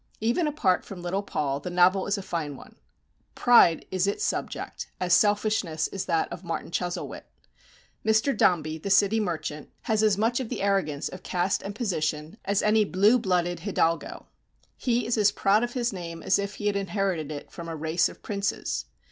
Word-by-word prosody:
Even 240 +10 +1
apart 230 -12 +1
from 180 -3 -9
little 185 +3 -1
Paul 145 -8 -2
the 160 - -6
novel 180 +2 +3
is 205 +1 0
a 200 - -5
fine 160 -6 -3
one. - - -14 0.6
Pride 235 -9 +5
is 185 +1 +1
its 200 - -1
subject, - - -3
as 180 -1 +1
selfishness 205 -5 +2
is 195 - -4
that 165 - +1
of 175 - -8
"Martin 165 -1 -4
Chuzzlewit." 175 0 -3 0.8
Mr. 220 +5 +2
Dombey, 160 -5 +2
the 200 - -5
city 200 +3 +4
merchant, 160 -6 -3
has 215 -1 +1
as 215 -3 +3
much 230 +4 +1
of 250 -4 -4
the 245 - -3
arrogance 185 -8 0
of 185 - -8
caste 180 +2 0
and 200 +1 -6
position 160 -5 -2
as 200 0 +1
any 215 0 +4
blue 205 +5 +4
blooded 175 -4 0
hidalgo. 170 -3 -1 0.5
He 245 -1 0
is 230 -1 0
as 205 -1 +5
proud 205 +4 +2
of 240 0 -3
his 240 -3 -1
name 170 -3 -7
as 190 - +3
if 200 0 -3
he 205 - -7
had 205 -1 +1
inherited 190 -5 -1
it 145 -1 -7
from 170 -1 -8
a 165 - -4
race 160 +3 +1
of - - -15
princes. 200 -1 -2
195 Hz, 190 wpm, -26 LUFS, 170-210 Hz, 0.8 s, Pride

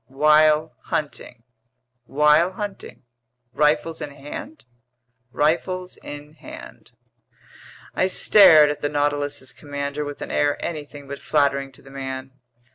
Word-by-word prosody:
"While 150 +3 +3
hunting?" 135 -5 -4 0.6
"While 150 +6 +3
hunting." 205 -6 -7 0.5
"Rifles 150 +2 +1
in - - -4
hand?" 145 - -9 0.7
"Rifles 180 +5 -1
in 145 +1 -10
hand." 155 - -12 1.0
I 185 - +1
stared 160 -6 +6
at 145 - -7
the 145 - -1
Nautilus's 145 -2 -2
commander 145 0 -5
with 145 -1 -6
an - - -7
air 145 0 +1
anything 145 -3 -6
but 140 +1 -7
flattering 140 -2 0
to - - -16
the 135 - -15
man. 135 -1 -6
145 Hz, 120 wpm, -22 LUFS, 140-155 Hz, 1.0 s, stared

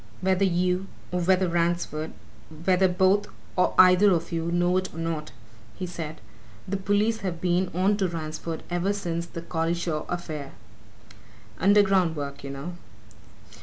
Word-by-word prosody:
"Whether 190 +1 +2
you, 180 +1 +1 0.2
or 180 0 0
whether 185 +1 +3
Ransford 170 -2 -1 0.5
whether 190 0 +4
both 190 +3 +3 0.3
or 180 - +2
either 185 +2 +7
of 165 -1 -2
you, 165 0 -1
know 175 +1 +2
it 185 0 -2
or - - -12
not," 165 -2 -3 0.4
he 185 - -4
said, 160 -3 -6 0.5
"the 195 - -1
police 205 +3 +1
have 180 -4 -3
been 180 +1 +1
on 195 +3 +2
to 195 -3 +1
Ransford 160 -1 -5
ever 175 +3 +1
since 170 -4 -3
that 170 0 -8
Collishaw 165 -1 -1
affair! 155 -5 -5 1.1
Underground 195 -3 +4
work, 140 -2 -5
you 140 - -6
know. 145 +6 -6
175 Hz, 145 wpm, -26 LUFS, 165-190 Hz, 1.1 s, either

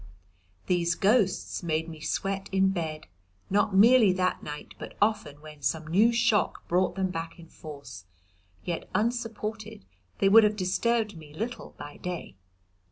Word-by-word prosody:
These 170 -2 +1
ghosts 205 -2 +1
made 160 -1 -1
me 160 -2 -9
to 155 - -5
sweat 195 +2 -2
in 190 0 +3
bed, 160 -5 -3 0.5
not 205 0 +2
merely 225 0 +7
that 185 0 0
night, 150 0 -8
but - - -9
often 210 -9 0
when 150 -1 -12
some 155 +5 -1
new 200 +9 +4
shock 230 -5 +1
brought 180 +2 +1
them 190 -1 -1
back 165 0 -5
in 170 - -12
force, 140 - -10 0.6
yet, 170 -2 -4
unsupported, 220 -2 -3 0.3
they 195 - +3
would 220 +3 +8
have 210 0 +2
disturbed 210 +3 0
me 155 -2 -12
little 230 +6 -5
by 145 0 -9
day. 180 - -6
190 Hz, 155 wpm, -28 LUFS, 160-215 Hz, 0.6 s, would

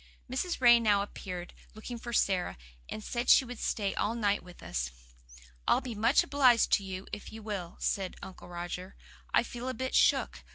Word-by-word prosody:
Mrs. 265 +8 -2
Ray 240 -2 +7
now 205 -3 +3
appeared, 180 -3 -7 0.2
looking 235 +2 -7
for 235 - -6
Sara, 190 - +1 0.3
and 215 - -6
said 240 +2 -2
she 265 - +7
would 245 -1 -8
stay 200 -3 -1
all 225 - -1
night 205 -3 +1
with 180 0 -14
us. - - -2 0.8
"I'll - - +5
be 245 - -6
much 225 +5 +4
obliged 255 -5 +4
to 200 - +4
you 190 0 -6
if 210 - -6
you 220 0 -9
will," 195 -5 -5
said 190 -2 -1
Uncle 190 - -10
Roger. 175 +2 -6 0.4
"I - - +4
feel 245 +1 -6
a 255 - -3
bit 260 +3 -3
shook. - - +3
215 Hz, 190 wpm, -30 LUFS, 190-240 Hz, 0.8 s, Ray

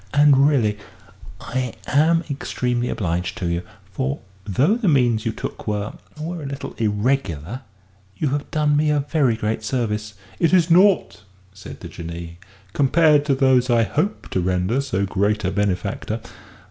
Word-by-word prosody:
And 145 -1 +6
really, 110 -8 +1 0.6
I 125 +1 -3
am 165 +4 +3
extremely 125 -4 -2
obliged 90 -2 -2
to 90 - -3
you. 85 0 -1 0.3
For, 65 +2 -2 0.3
though 130 - +2
the 235 -4 -1
means 120 -7 +3
you - - +1
took - - -7
were 105 0 -2 0.3
were 165 +2 -4
a - - -7
little 140 0 -6
irregular, 105 - -1 0.6
you 150 - 0
have 145 +1 -3
done 150 -1 +1
me 150 +1 +2
a 150 -1 +2
very 140 -5 +1
great 110 0 -2
service." 110 -3 -2 0.2
"It 165 0 +2
is 175 -2 +4
naught," 175 - +4 0.3
said 95 -1 -11
the - - -7
Jinnee, 85 0 -8 0.3
"compared 150 +1 +4
to 140 -2 +2
those 130 -2 +3
I 120 -1 +4
hope 170 - -2
to 95 - 0
render 90 +8 0
so 110 -8 -1
great 100 +2 0
a 90 - +1
benefactor." 95 -2 -2
125 Hz, 160 wpm, -22 LUFS, 105-145 Hz, 0.6 s, And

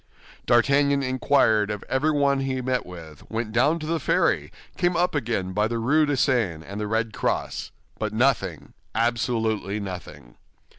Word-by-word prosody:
D'Artagnan 140 +3 +3
inquired 130 -5 +2
of 105 -1 -4
everyone 140 0 +2
he 135 -1 -2
met 125 -3 -1
with, 80 -4 -11
went 110 0 -3
down 130 +8 +3
to 155 - -6
the 165 +1 -1
ferry, - - +1 0.2
came 175 -1 +1
up 180 +1 +1
again 110 -10 -2
by 105 +2 +2
the 115 +1 -2
Rue 150 +7 +2
de 145 -2 0
Seine, 110 - +1
and 100 +2 -6
the 105 - -2
Red 110 0 -1
Cross; - - -2 0.3
but 110 -1 -2
nothing, 125 +4 0 0.2
absolutely 110 -3 0
nothing! 90 -11 -8
120 Hz, 155 wpm, -24 LUFS, 105-140 Hz, 0.3 s, D'Artagnan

